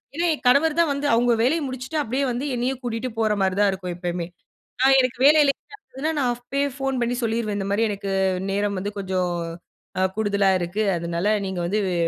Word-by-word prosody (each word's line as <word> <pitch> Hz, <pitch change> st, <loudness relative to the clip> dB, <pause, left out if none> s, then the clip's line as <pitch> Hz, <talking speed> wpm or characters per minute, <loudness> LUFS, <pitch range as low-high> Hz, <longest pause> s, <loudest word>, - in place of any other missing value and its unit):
ஏன்னா 340 Hz, +2 st, 0 dB
என் 300 Hz, -, -7 dB
கணவர்தான் 310 Hz, +4 st, +4 dB
வந்து 280 Hz, +1 st, -2 dB
அவுங்க 240 Hz, +1 st, +3 dB
வேலைய 310 Hz, +7 st, +2 dB
முடிச்சுட்டு 260 Hz, +3 st, -5 dB
அப்பிடியே 265 Hz, +1 st, -1 dB
வந்து 245 Hz, +4 st, -3 dB
என்னைய 245 Hz, +2 st, 0 dB
கூட்டிட்டு 240 Hz, +1 st, -3 dB
போறமாரி 205 Hz, -4 st, +1 dB
தான் 205 Hz, -1 st, +4 dB
இருக்கும் 185 Hz, -2 st, -5 dB
எப்பயுமே! 175 Hz, -1 st, -3 dB, 0.6 s
நான் 270 Hz, +1 st, +6 dB
எனக்கு 255 Hz, -1 st, -1 dB
வேலை 305 Hz, +2 st, +7 dB, 0.6 s
இல்லன்னா 305 Hz, +4 st, 0 dB
நான் 255 Hz, -3 st, +2 dB
அப்பயே 260 Hz, +4 st, -2 dB
ஃபோன் 270 Hz, -1 st, -1 dB
பண்ணி 240 Hz, +1 st, 0 dB
சொல்லிருவேன். 225 Hz, -2 st, -1 dB
இந்தமாரி 200 Hz, +2 st, 0 dB
எனக்கு 200 Hz, -1 st, -4 dB, 0.4 s
நேரம் 200 Hz, 0 st, 0 dB
வந்து 200 Hz, +2 st, -3 dB
கொஞ்சம் 185 Hz, -2 st, -1 dB, 0.7 s
அ -, -, +2 dB
கூடுதலா 205 Hz, -2 st, +2 dB
இருக்கு. 175 Hz, +4 st, -2 dB
அதனால 170 Hz, +4 st, -1 dB
நீங்க 190 Hz, -1 st, -4 dB
வந்து 195 Hz, +5 st, 0 dB
வெ 185 Hz, -, -1 dB
225 Hz, 180 wpm, -23 LUFS, 195-265 Hz, 0.7 s, வேலை